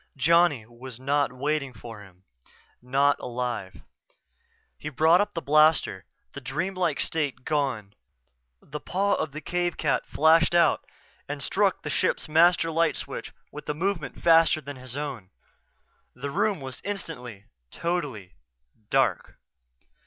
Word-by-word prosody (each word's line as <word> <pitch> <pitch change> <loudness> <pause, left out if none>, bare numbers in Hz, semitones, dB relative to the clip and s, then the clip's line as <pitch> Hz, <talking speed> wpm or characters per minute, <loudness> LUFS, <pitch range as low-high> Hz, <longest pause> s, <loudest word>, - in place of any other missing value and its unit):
Johnny 165 -4 +3
was 120 +1 -11
not 140 +1 +1
waiting 140 +1 -2
for 115 -4 -10
him 95 -2 -17 0.6
not 140 +3 +2
alive 120 -9 -4 0.9
He 150 - -6
brought 160 +6 +4
up 205 -1 -3
the 165 - -3
blaster, 150 -10 +3 0.3
the 140 - -8
dream 155 +10 -3
like 170 -6 0
state 145 -6 -1
gone. 130 -9 -1 0.7
The 150 +1 -7
paw 200 +6 0
of 155 - -1
the 155 +3 -7
cave 175 0 -1
cat 150 - 0
flashed 165 +2 +4
out 170 -1 +4 0.5
and - - -4
struck - - +1
the - - -3
ship's - - 0
master 165 +1 +4
light 165 0 +2
switch - - -5 0.2
with 150 0 -9
a 150 - -1
movement 175 -1 -2
faster 165 -1 +5
than 145 -2 -8
his 130 +1 -7
own. 135 -10 -5 0.9
The 140 +3 -5
room 205 0 0
was 130 -1 -7
instantly, 125 - -6 0.2
totally, 140 - -3 0.6
dark. 130 -9 +1
145 Hz, 140 wpm, -26 LUFS, 125-165 Hz, 0.9 s, faster